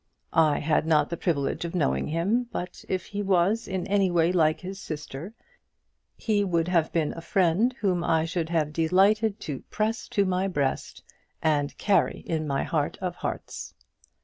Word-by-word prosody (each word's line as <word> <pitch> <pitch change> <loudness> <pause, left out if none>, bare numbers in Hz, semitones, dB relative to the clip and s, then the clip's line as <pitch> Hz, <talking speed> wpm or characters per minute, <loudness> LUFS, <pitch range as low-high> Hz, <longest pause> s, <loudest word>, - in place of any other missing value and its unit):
I 155 -2 +4
had 155 +1 +1
not 155 0 +3
the - - 0
privilege 155 -4 -1
of 170 +1 -4
knowing 65 - +1
him, 200 +10 0
but 180 - -6
if 185 -2 -1
he 205 0 -4
was 195 +3 +2
in 190 -2 -2
any 195 -1 +2
way 170 -1 +3
like 155 -3 +2
his 190 +1 -7
sister, 155 +5 -7 0.8
he 210 -2 +1
would 170 -3 0
have 170 -3 +2
been 160 -3 0
a 165 - -7
friend 190 +6 +2
whom 180 -4 +1
I 160 -1 +2
should 165 -1 -2
have 155 -3 0
delighted 200 +6 +3
to 145 -4 -4
press 220 +1 -1
to 200 - +1
my 185 +1 0
breast 145 -8 -2 0.4
and 145 -2 0
carry 205 -2 +2
in 155 -2 -2
my 140 -1 0
heart 155 -4 -1
of 180 -2 -3
hearts. - - -5
170 Hz, 175 wpm, -26 LUFS, 160-195 Hz, 0.8 s, I